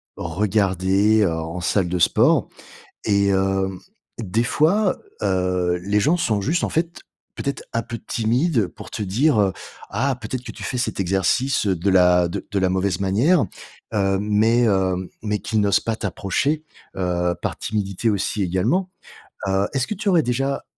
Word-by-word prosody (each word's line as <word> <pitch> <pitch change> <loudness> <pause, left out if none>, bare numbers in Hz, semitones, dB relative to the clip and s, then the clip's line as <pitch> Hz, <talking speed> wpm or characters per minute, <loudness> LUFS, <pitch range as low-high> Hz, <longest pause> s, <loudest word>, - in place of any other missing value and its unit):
regardés, 95 +3 +1
heu, 85 - +2
en 80 +2 -4
salle 90 0 +1
de 90 0 -1
sport. - - +3 0.6
Et 100 -2 +2
hem, 95 -1 0 0.4
des 110 +1 0
fois, 185 - +2 0.3
heu, 90 -2 +1
les 105 +1 +2
gens 160 +9 +3
sont 110 -11 0
juste 165 - 0
en - - -1
fait 170 +1 -2 0.4
peut-être 140 0 -3
un 115 0 0
peu 115 +1 -6
timides 120 - +1
pour - - -12
te - - -6
dire, 115 +6 +2
heu: 95 -2 +2 0.4
«Ah, 130 +5 0
peut-être 130 -1 -5
que - - -8
tu - - -9
fais 125 - -3
cet 125 -3 -2
exercice 95 +7 +1
de 95 +1 0
la 90 -2 +5
de 85 - -5
de 100 - 0
la 95 -1 +2
mauvaise 95 -1 0
manière.» 120 - +2 0.5
heu, 95 -1 +2
mais 110 +3 +3
heu, 95 -2 +1
mais 105 -1 -1
qu'ils 110 -1 -1
n'osent 100 -1 +3
pas 115 - -2
t'approcher, 115 - -1 0.3
heu, 90 -1 0
par - - -3
timidité 105 +1 -1
aussi 100 +1 -1
également. 115 - 0 0.6
Heu, 95 +1 +1
est-ce 135 -2 +1
que - - -2
tu 205 +1 -1
aurais 170 -5 +4
déjà 135 +3 -1
100 Hz, 165 wpm, -22 LUFS, 95-125 Hz, 0.6 s, la